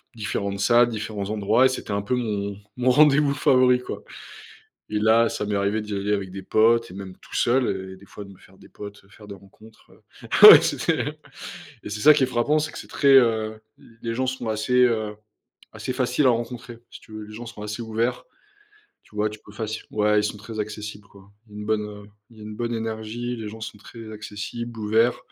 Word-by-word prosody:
différentes 100 -2 -3
salles, 120 +3 +4
différents 105 -3 -5
endroits 110 +4 +2
et - - +5
c'était 130 -4 -5
un 100 - -1
peu 115 +5 -1
mon 100 -4 -3 0.2
mon 125 +1 +2
rendez-vous 145 0 +5
favori, 130 -4 +4
quoi - - -7 0.9
et 105 0 -1
là, 110 +2 +4
ça 105 - -3
m'est 105 0 -2
arrivé 100 +2 0
d'y 105 -1 -6
aller 100 +1 -1
avec 95 -2 -3
des 95 0 -8
potes 115 +1 +3
et - - -11
même 95 -1 -8
tout - - -13
seul 100 -7 0
et - - -13
des 100 - -17
fois 100 +1 -10
de 100 - -13
me 95 - -16
faire 95 +1 -20
des - - -17
potes, 100 0 -10
faire 105 +1 -15
des 100 - -8
rencontres 105 +3 -19 0.5
heu - - +15
ouais, - - +11
c'est - - -2 0.9
et - - -7
c'est 105 0 -5
ça 155 +5 +8
qui 140 - +2
est - - +5
frappant, 125 +5 +1
c'est 155 +1 -3
que - - -8
c'est - - -10
très, 140 - +1
heu, 110 -4 +3 0.4
les 115 -1 -3
gens 130 +2 0
sont 125 -3 -3
assez, 110 +3 -2
heu, 110 -3 -1 0.6
assez 130 - -5
faciles 125 +2 +1
à 130 - +6
rencontrer, 120 +1 -4
si - - -12
tu 110 - -18
veux. 110 - -7
Les 105 - -12
gens 120 +2 -8
sont 115 -2 -10
assez 105 +2 -5
ouverts, 115 +2 -2 0.8
tu - - -23
vois? 105 0 0
Tu 105 - -10
peux 105 - -14
facile 110 +1 -5
ouais 105 0 +2
ils 105 - -2
sont 105 - -3
très 110 +1 -7
accessibles, 105 -1 -7
quoi, 100 0 -18 0.2
une 105 0 -8
bonne, 110 -1 +1
heu, 105 -1 -11 0.3
une 105 -1 -10
bonne 120 0 -3
énergie. 115 +2 -4
Les 110 -2 -6
gens 110 +1 -10
sont 105 - -7
très 110 +1 -11
accessibles, 110 +2 -7
ouverts. 110 +3 +2
110 Hz, 220 wpm, -24 LUFS, 105-120 Hz, 0.9 s, heu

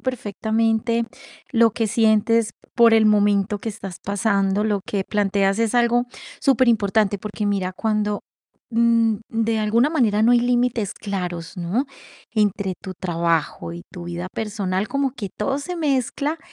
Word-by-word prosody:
perfectamente 225 -1 0 0.5
lo 230 -3 +4
que 225 -1 -1
sientes, 220 +1 +2 0.2
por 230 -1 +6
el 220 -1 +5
momento 205 -1 +3
que 225 - -5
estás 195 -4 -7
pasando. 200 0 0
Lo 210 -2 0
que 195 -2 -2
planteas 200 -1 +1
es 230 0 0
algo 240 0 +3 0.3
superimportante, 220 -5 +2
porque 210 +1 -5
mira, 195 -2 -1
cuando, 210 0 -1 0.5
mm, 230 -1 +3
de 225 0 0
alguna 230 +7 +2
manera 220 -9 +2
no 230 - +5
hay 240 - +5
límites 240 -4 0
claros, 180 -4 -5
¿no? 185 +11 -1 0.4
Entre 205 -3 0
tu 190 -1 -7
trabajo 165 - -1
y 85 0 -8
tu 175 -1 -8
vida 175 +1 -5
personal, 205 -3 -2
como 275 -2 0
que 210 -7 -6
todo 270 +6 -1
se 355 +5 -5
mezcla 290 +1 -1
215 Hz, 145 wpm, -22 LUFS, 195-230 Hz, 0.5 s, por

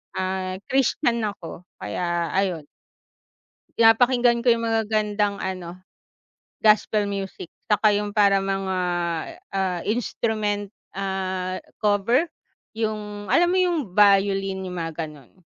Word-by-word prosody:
ah, 185 0 -2 0.2
Christian 260 -2 +2
ako, 180 -3 -8
kaya 170 +10 -2
ayon. 185 -5 0 1.2
Pinapakinggan 240 +1 +4
ko 245 - +6
'yong 230 0 -1
magagandang 210 -2 0
ano, 185 -1 -5 0.8
gospel 215 0 +4
music. 195 -3 -5 0.2
Tsaka, 210 0 +4
yung 205 0 -5
parang 200 -2 +4
mga, 195 -1 -1 0.8
ah, 190 -2 -1
instrument 215 -2 -1 0.2
ah 190 -1 -2 0.2
cover, 210 - +2 0.5
yung 210 -2 -4
alam 345 - +4
mo 375 - +2
yung 355 -2 +2
violin, 195 -1 +3
yung 180 -1 -6
mga 165 0 -3
gano'n. 150 +3 -14
200 Hz, 110 wpm, -24 LUFS, 185-220 Hz, 1.2 s, ko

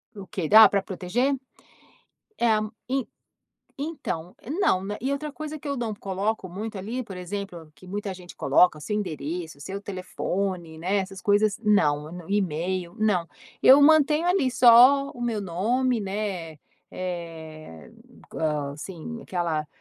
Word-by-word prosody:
Ok, 190 -4 -5
da 220 +1 +10
pra 200 - +1
proteger? 210 +9 -1 1.0
É, 235 - +2 0.4
en 265 0 -1 0.7
então, 275 - -5 0.2
não, 190 - +2
né, 205 +1 -3
e 265 +3 -1
outra 290 +2 -3
coisa 310 +1 -6
que 300 - -9
eu 280 - -1
não 230 -4 -3
coloco 200 +1 -2
muito 210 +4 -6
ali, 225 +7 -4
por 195 -5 -9
exemplo, 180 -3 -6
que 150 +5 -16
muita 200 +1 -4
gente 180 -1 -12
coloca, 175 -4 +3
seu 210 +8 -3
endereço, 160 -4 -4
seu 195 +7 -6
telefone, 185 -3 -4
né, 185 +5 0
essas 195 0 -4
coisas, 205 +1 +2
não, 175 -6 +1
e-mail, 185 -2 -1
não. 195 -6 +1 0.4
Eu 275 +2 +9
mantenho 310 +2 +5
ali 355 -8 +2
só 255 +4 +7
o - - -13
meu 235 -3 -1
nome, 230 +8 0
né, 190 -6 -4 0.3
eh, 160 - -7 0.4
co - - -9 0.4
assim 185 +9 -7
aquela 165 -4 -2
195 Hz, 140 wpm, -25 LUFS, 175-235 Hz, 1.0 s, da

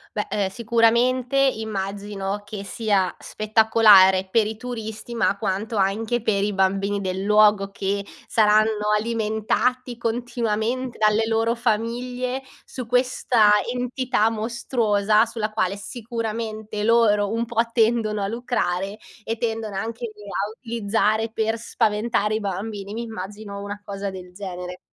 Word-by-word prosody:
Beh, 210 - -2
ehm, 200 -2 0
sicuramente 235 +4 +2
immagino 205 -5 -1
che 205 -1 -7
sia 195 -1 0
spettacolare 215 -3 +5
per 225 +1 +3
i 215 0 -4
turisti, 225 -1 -6
ma 210 -3 +1
quanto 210 +2 -2
anche 215 +5 0
per 200 -3 +1
i 210 - 0
bambini 195 +1 +1
del 190 0 -3
luogo, 210 -1 +4
che 200 0 -2 0.2
saranno 210 -1 +3
alimentati 230 +3 -1
continuamente 235 +1 -2
dalle 215 +1 +3
loro 225 +1 +1
famiglie 245 +3 -1 0.2
su 255 -2 -7
questa 250 -3 +3 0.2
entità 250 -2 0
mostruosa, 220 -2 +1
sulla 225 -2 -3
quale 200 -2 0
sicuramente 220 -1 -4
loro 210 -2 +3
un 230 +1 -1
po' 230 -1 +1
tendono 225 -2 +2
a 195 - 0
lucrare 200 -4 -2 0.3
e 225 +1 -3
tendono 225 -3 -3
anche 230 +2 -4
lì 210 -1 -15
a 200 0 -3
utilizzare 225 -1 0
per 225 0 -1
spaventare 215 -1 0
i 220 - -2
bambini. 200 +1 -4
Mi 235 - -3
immagino 205 -1 -7
una 205 0 -6
cosa 200 0 -5
del 180 -1 -9
genere. 180 -2 -7
215 Hz, 130 wpm, -23 LUFS, 200-230 Hz, 0.3 s, spettacolare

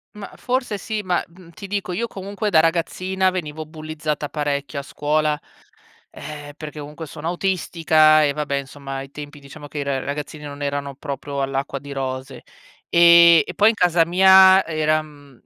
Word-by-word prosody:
Mah, 210 -1 -9
forse 250 -4 -2
sì, 215 +3 -4
ma, 180 -3 -1
mhmm, 170 0 -17
ti 200 +4 -10
dico, 200 -2 -3
io 230 +7 -2
comunque 200 +1 -4
da 165 -5 +5
ragazzina, 185 +3 0
venivo 155 -4 -5
bullizzata 155 -1 -5
parecchio 145 -2 -3
a - - -4
scuola, 150 +1 -1 0.7
ehm, 145 -1 -9
perché 155 -1 -8
comunque 150 +2 -8
sono 150 +2 -6
autistica, 165 -4 +3
e 145 - +2
vabbè 145 -1 -2
insomma 140 0 -6
ai 135 0 -7
tempi, 145 +1 -9
diciamo 145 +1 -12
che 145 - -7
i - - -2
r 135 -2 -2
ragazzini 150 +1 -6
non 145 0 -8
erano 140 -1 -3
proprio 140 0 -6
all'acqua 135 +1 -3
di 140 +1 -10
rose, 130 -1 -5 0.5
e 170 -1 +8
e 180 - -7
poi 210 +5 +5
in - - -2
casa 175 -4 +3
mia 190 +2 +7
era 155 -1 +1
mhmm, 145 -4 -15
155 Hz, 175 wpm, -21 LUFS, 145-180 Hz, 0.7 s, e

